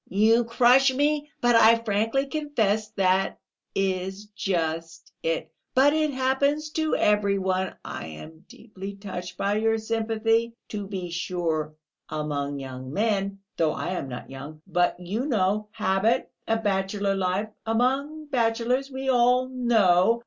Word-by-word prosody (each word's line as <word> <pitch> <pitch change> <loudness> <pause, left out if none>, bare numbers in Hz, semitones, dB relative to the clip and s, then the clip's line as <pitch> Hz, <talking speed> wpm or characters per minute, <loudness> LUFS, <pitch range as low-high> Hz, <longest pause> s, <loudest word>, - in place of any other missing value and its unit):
"You 220 +4 +4
crush 250 +3 +5
me! 295 +2 0
But 240 -1 +4
I 230 0 +7
frankly 225 +4 0
confess 230 -9 0
that 190 0 +2 0.4
is 190 +1 -1
just 165 -3 -2
it... 160 -1 -2 0.2
but 275 +3 +5
it 310 -1 +2
happens 280 +3 0
to 315 0 0
every 205 -1 +2
one!... 190 0 -1
I - - -6
am 155 - -11
deeply 200 -3 -9
touched 180 -3 -7
by 200 +1 0
your 225 +1 +2
sympathy. 225 +1 0
To 205 -2 -5
be 185 -3 -5
sure, 165 -3 -2 0.3
among 145 -2 -3
young 130 -1 -7
men... 200 0 0 0.2
though 160 -2 +2
I - - -4
am 180 -7 -3
not 125 +1 -8
young; 145 +3 -9
but 180 -1 +1
you 205 +10 -3
know, 210 -3 +1
habit, 215 +4 +1 0.2
a 225 - +2
bachelor 200 -1 0
life, 195 +2 -1 0.2
among 270 +7 0
bachelors, 245 0 0
we 265 0 -5
all 250 0 +3
know...." 230 -5 +3
210 Hz, 140 wpm, -26 LUFS, 185-240 Hz, 0.4 s, I